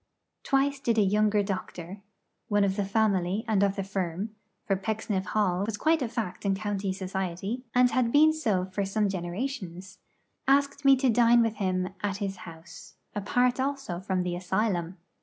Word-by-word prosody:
Twice 275 +1 +1
did 235 -5 0
a 215 - +5
younger 210 +1 +2
doctor 190 -1 -5 0.5
one 205 -3 +2
of 195 -1 +1
the 200 -1 -1
family 200 -1 +1
and 210 -3 +2
of 200 -1 +2
the 195 - -2
firm, 190 +1 -3 0.3
for 200 -5 +1
Pecksniff 205 -1 -2
Hall 195 -3 +1
was 210 0 -3
quite 315 +5 +2
a 245 - -1
fact 220 -6 -4
in 195 -1 +1
county 200 -1 -2
society, 190 +5 -4
and 250 0 +5
had 245 -2 +1
been 310 +3 +6
so 215 -12 0
for 190 +2 -3
some 205 +1 0
generations 190 0 -5 0.5
ask 280 +1 +2
me 275 -1 +7
to 265 0 +1
dine 235 0 +5
with 225 -1 -1
him 185 -2 0
at 200 -2 -1
his 195 -2 -3
house, 165 0 -13 0.2
apart 245 +5 +1
also 270 -9 -2
from 185 -1 -1
the 175 -1 -2
asylum. 185 -1 -1
200 Hz, 175 wpm, -28 LUFS, 185-235 Hz, 0.5 s, me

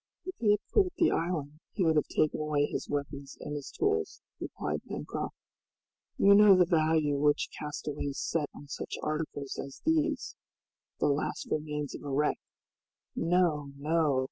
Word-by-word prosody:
"If 370 - -4
he 220 - +2
had 210 0 +4
quitted 380 -3 +3
the 335 - +4
island 155 -3 -2
he 185 - +1
would 160 -1 +3
have 150 - +2
taken 155 - +1
away 150 -1 +1
his - - -4
weapons 140 -1 -4
and 145 - -6
his 145 -2 -5
tools," 425 +2 -1 0.2
replied - - -3
Pencroft. - - -4 0.8
"You 200 - +6
know 205 -1 +8
the 180 - +6
value 155 -4 +2
which 145 0 +2
castaways 150 -1 -4
set 155 -3 -1
on 145 - -11
such 145 - -5
articles 150 -3 -3
as 135 0 -11
these 315 -3 +1 0.6
the - - +2
last 145 +1 -1
remains 150 -1 -2
of - - -7
a 145 - -6
wreck. 145 +2 +1 0.8
No! 165 -5 +1
no!" 150 -2 +2
155 Hz, 160 wpm, -30 LUFS, 145-180 Hz, 0.8 s, know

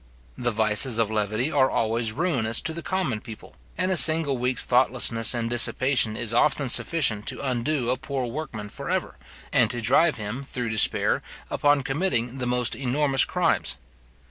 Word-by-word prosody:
The 125 -1 -1
vices 110 +2 +2
of 115 -2 0
levity 110 +6 -1
are 135 -2 +2
always 115 0 -1
ruinous 125 -6 0
to 160 - -3
the 170 - -6
common 170 - -2
people, 110 -3 -12 0.2
and 185 +2 0
a - - +2
single 160 -4 +5
week's 125 +1 0
thoughtlessness 120 -2 +2
and 115 -1 -2
dissipation 120 -1 +2
is 115 -1 -2
often 140 +1 +1
sufficient 125 -7 +1
to - - -5
undo 125 0 -1
a 130 - -1
poor 135 -3 -4
workman 120 -5 -6
for - - -8
ever, - - -3 0.4
and 115 -3 +3
to 120 0 -2
drive 140 +8 +2
him, 110 +5 -6
through 125 -3 -4
despair, 110 -1 +1 0.3
upon 145 -1 +2
committing 135 -4 -2
the 125 - -3
most 125 -1 -1
enormous 135 +1 0
crimes. - - -1
125 Hz, 170 wpm, -24 LUFS, 115-140 Hz, 0.4 s, single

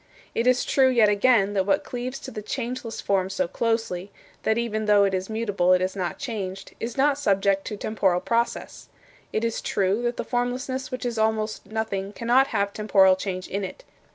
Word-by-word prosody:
It 235 - 0
is 250 -1 +3
true, 265 -1 +4
yet 235 -5 +4
again, 205 -1 +3
that 190 -1 0
what 195 0 +2
cleaves 250 +2 -5
to 265 - -7
the 215 - -6
changeless 235 +1 -4
form 190 -2 0
so 185 -2 -1
closely 225 -2 -1 0.3
that 220 - +1
even 220 -2 -1
though 205 -1 +5
it 195 -1 +1
is 185 +1 -2
mutable 205 -5 +1
it 185 - +3
is 185 +1 -2
not 180 -4 -3
changed 195 -6 -5
is 230 +2 -5
not 280 +1 +3
subject 195 -5 +2
to 210 - -5
temporal 195 -4 +1
process. 235 +4 -2 0.4
It 220 - 0
is 230 - -2
true 200 +3 0
that 240 0 -1
the - - -2
formlessness 255 +2 -2
which 255 0 -5
is 235 -2 -2
almost 220 -1 0
nothing 205 -2 -3
cannot 245 +5 +3
have 200 -5 -1
temporal 195 -3 +4
change 185 -1 -4
in 200 +1 -3
it. 345 - -7
215 Hz, 195 wpm, -25 LUFS, 195-240 Hz, 0.4 s, though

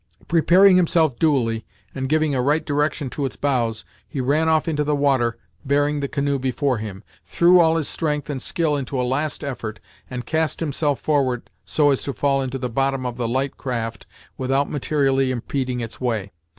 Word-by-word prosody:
Preparing 180 +3 +5
himself 160 -6 +2
duly, 120 -8 +1 0.3
and 130 -1 -3
giving 155 -1 +2
a 130 - +1
right 145 +5 +1
direction 145 0 0
to 145 - -3
its 135 - -2
bows, 120 -6 -1 0.2
he 140 - -5
ran 150 +5 +2
off 160 +1 +2
into 150 -2 0
the 150 0 +1
water 135 -5 +1 0.3
bearing 145 +1 +1
the 140 - -2
canoe 140 -1 -1
before 130 -1 0
him, 100 -3 -7 0.2
threw 175 +1 +4
all 165 -1 +4
his 155 - -1
strength 150 -3 -2
and 140 -3 -4
skill 160 -2 0
into 135 -1 -3
a 125 - +1
last 145 +4 -2
effort, 115 -6 -5 0.3
and 125 -2 -5
cast 160 +1 -1
himself 145 -2 -1
forward 135 -5 0
so 145 -2 +3
as 135 - 0
to 140 - -3
fall 140 0 +1
into 135 0 -3
the 125 -1 -3
bottom 135 +2 -1
of 125 -1 -4
the 120 -2 -1
light 130 +3 -1
craft 115 -3 -4 0.3
without 135 +2 +1
materially 135 -2 +1
impeding 125 0 -2
its 115 +1 -7
way. 110 -6 -1
140 Hz, 190 wpm, -22 LUFS, 125-150 Hz, 0.3 s, Preparing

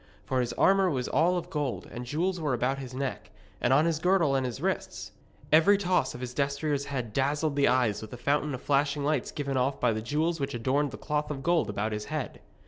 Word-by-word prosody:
For 130 - 0
his 120 -1 -2
armour 195 -1 +4
was 130 -6 -1
all 175 +3 +2
of 175 - -5
gold, 145 -5 -2
and 120 0 -7
jewels 175 +7 -1
were 145 -5 0
about 130 +3 0
his 130 -3 -7
neck, 130 +1 -4 0.3
and 120 - +2
on 145 +4 +5
his 165 -2 0
girdle 180 -4 +3
and 135 -1 +1
his 120 - -6
wrists. - - -3 0.4
Every 165 +7 +6
toss 180 -10 0
of 120 - -8
his 125 -1 -5
destrier's 140 +1 -1
head 125 -6 -4
dazzled 145 +3 0
the 140 -1 +3
eyes 120 -5 +2
with 110 - -8
the 125 - -8
fountain 145 +2 0
of 125 - -10
flashing 140 0 +1
lights 145 -3 0
given 140 -2 -2
off 130 +2 0
by 125 -2 +2
the 110 - -3
jewels 155 +8 -1
which 140 -2 -2
adorned 135 +5 +1
the 135 - -8
cloth 150 0 -2
of 135 -2 -5
gold 170 -5 +2
about 105 +2 -2
its 105 0 -4
head. 155 -3 -4
140 Hz, 230 wpm, -28 LUFS, 125-155 Hz, 0.4 s, Every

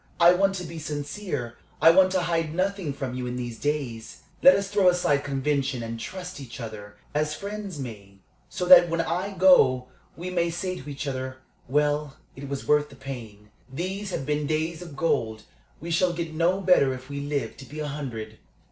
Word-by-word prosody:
I 175 +1 +8
want 195 +2 +2
to 180 - -4
be 165 -1 -7
sincere 145 - -4 0.2
I 160 +2 +8
want 185 +2 +5
to 185 - +2
hide 165 -2 -1
nothing 190 -3 -1
from 135 -2 -4
you 125 0 -4
in 125 - -3
these 120 -2 -5
days. 135 -7 -3 0.2
Let 275 - +9
us 200 0 -1
throw 200 -2 +4
aside 160 -5 +2
convention 135 -2 -1
and 115 0 -5
trust 185 +3 -7
each 130 -2 -9
other, 105 -3 -8 0.2
as 150 +1 0
friends 200 -2 -6
may, 105 -7 -8 0.3
so 180 - -3
that 175 -1 +9
when 165 0 +1
I 185 +4 -2
go 130 -9 +5 0.3
we 180 +2 -5
may 170 -1 +1
say 185 +2 -3
to 140 - -9
each 140 0 -5
other, 130 -1 -4 0.3
'Well, 145 +1 0 0.2
it 135 +1 -8
was 140 -1 -5
worth 150 0 +3
the 140 - -14
pain. 115 -6 -9 0.2
These 190 +7 -4
have 135 - -3
been 150 0 -1
days 160 +2 -1
of 170 -5 -9
gold 110 -8 0 0.4
we 170 +2 -6
shall 175 +1 +2
get 165 -2 -4
no 175 +4 +2
better 155 -8 +4
if 130 0 -11
we 140 0 -5
live 140 -5 -2
to 135 - -10
be 150 +5 -9
a 150 - -2
hundred.'" 120 -7 -6
150 Hz, 200 wpm, -26 LUFS, 130-175 Hz, 0.4 s, Let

